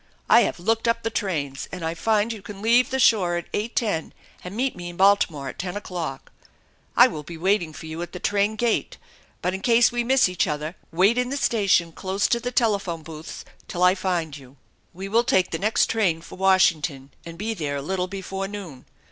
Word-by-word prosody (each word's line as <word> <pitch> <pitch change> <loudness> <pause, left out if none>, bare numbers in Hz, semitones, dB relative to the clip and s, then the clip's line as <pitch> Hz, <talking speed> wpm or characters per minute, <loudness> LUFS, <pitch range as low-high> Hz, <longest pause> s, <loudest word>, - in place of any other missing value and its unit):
I - - +7
have - - -1
looked 225 +5 0
up 230 0 +1
the 225 - -1
trains 145 -10 -3
and 180 -2 -5
I 165 - -1
find 215 +5 +1
you 215 - -9
can 205 0 -9
leave 235 +4 +3
the 265 - -1
shore 195 -8 +3
at 175 - -7
8.10 210 -5 -2 0.3
and 180 +2 -7
meet 260 +2 0
me 175 -1 -7
in 175 - -11
Baltimore 190 -8 +3
at - - -11
ten 185 +1 -3
o'clock. 170 -9 -6 0.7
I - - +9
will 155 - -2
be 165 +3 -9
waiting 180 -1 +1
for 160 - -10
you 160 +1 -6
at 175 0 -6
the 180 - -7
train 205 +3 +1
gate, 230 +1 -1 0.5
but 180 - 0
in 190 - -4
case 235 +1 +4
we 240 0 -1
miss 260 0 +4
each 180 -1 0
other 150 +3 -3 0.2
wait 195 +8 +3
in 250 0 0
the 280 - -2
station, 195 -9 +2
close 190 +4 -2
to 235 - +2
the 245 +1 -4
telephone 200 -9 0
booths, 155 0 -9 0.2
till 180 - -2
I 180 0 +6
find 180 -6 -2
you. 135 -1 -14 0.3
We 190 +2 -7
will 230 +4 +3
take 185 -6 +2
the 165 - -2
next 215 +3 +2
train 185 -8 0
for - - -11
Washington 160 -8 +2
and 170 0 -9
be 220 +4 -2
there 150 -8 -3
a 140 - -3
little 185 +3 -2
before 195 0 -5
noon. 190 -10 -9
190 Hz, 215 wpm, -24 LUFS, 165-220 Hz, 0.7 s, I